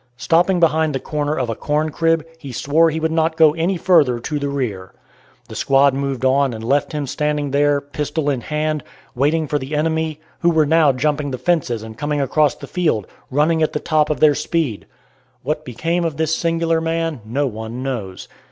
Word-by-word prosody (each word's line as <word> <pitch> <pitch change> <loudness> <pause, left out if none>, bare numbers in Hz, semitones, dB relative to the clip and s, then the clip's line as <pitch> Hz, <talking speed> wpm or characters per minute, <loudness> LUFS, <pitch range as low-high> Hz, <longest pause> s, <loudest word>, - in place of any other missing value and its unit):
Stopping 175 +6 +2
behind 160 -2 +2
the - - -1
corner 150 +2 -2
of 125 - -1
a 115 - -2
corn 150 +6 -1
crib 165 0 +1
he 140 -4 -8
swore 150 +7 +2
he 160 0 -3
would 160 0 -1
not 160 0 0
go 155 -2 +6
any 170 +4 0
further 160 -8 +3
to 150 +5 -3
the 140 0 -2
rear. 110 -10 -4 0.5
The - - -10
squad 135 0 +3
moved 135 -1 -2
on 135 -1 +2
and 110 - -7
left 140 +5 +1
him 150 -2 -3
standing 150 +1 -1
there, 145 +1 +3
pistol 145 +1 -4
in 135 -4 0
hand, 155 +1 -2 0.3
waiting 150 +5 +1
for 145 +1 0
the 135 +3 -5
enemy, 160 0 -1 0.2
who 170 - +3
were 160 -2 +3
now 155 -1 +4
jumping 145 +2 -1
the 130 - -4
fences 130 -9 0
and 110 0 -10
coming 145 0 -1
across 145 +1 +2
the - - -10
field, 155 - 0 0.2
running 155 +4 +2
at 155 - +1
the 150 - -1
top 155 -2 +1
of 150 - -1
their 150 -1 +6
speed. 145 -8 -2 0.6
What 150 +3 -2
became 165 +8 -1
of 165 -4 -2
this 160 0 0
singular 165 0 0
man 165 -4 -2
no 130 +7 -1
one 115 +1 -5
knows. 110 -9 -5
150 Hz, 200 wpm, -19 LUFS, 135-160 Hz, 0.6 s, go